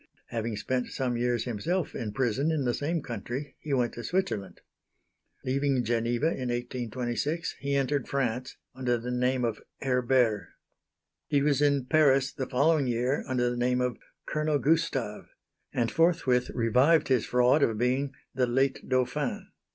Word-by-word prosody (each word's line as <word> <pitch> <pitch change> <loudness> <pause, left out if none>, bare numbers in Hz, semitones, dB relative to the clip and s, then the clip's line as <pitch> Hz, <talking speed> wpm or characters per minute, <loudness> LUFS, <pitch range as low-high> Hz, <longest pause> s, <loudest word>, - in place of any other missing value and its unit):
Having 115 -2 -3
spent 125 +4 -1
some 125 -3 -2
years 120 -1 0
himself 155 - -2
in 110 -4 -4
prison 130 +5 0
in 150 -4 0
the 120 - +1
same 160 +4 -2
country, 125 +5 -5
he 150 - -6
went 125 -3 +1
to 120 - -7
Switzerland. 175 - -2 0.8
Leaving 135 -1 +1
Geneva 120 +3 0
in 130 -6 -1
1826, 120 +5 -3
he 140 0 -1
entered 140 -1 0
France, 125 -1 -2 0.2
under 125 -2 0
the 120 +2 -5
name 125 0 +1
of 115 -2 -2 0.2
Herbert. 125 -6 +1 0.8
He 145 -2 +2
was 145 -1 +2
in 140 -3 +3
Paris 135 -2 +3
the 130 - -4
following 145 +2 +3
year 125 +3 0
under 125 -2 +1
the 120 - -4
name 125 +1 +1
of 125 -1 -1 0.3
"Colonel 155 -1 0
Gustave," 140 -8 0 0.5
and 120 -2 0
forthwith 160 -7 +2
revived 130 +7 +3
his 130 -4 +2
fraud 125 +4 +4
of 115 -5 +2
being 130 +4 +1 0.2
"the 125 -1 +1
late 135 +2 +1
Dauphin." 130 +3 -1
125 Hz, 150 wpm, -28 LUFS, 120-140 Hz, 0.8 s, fraud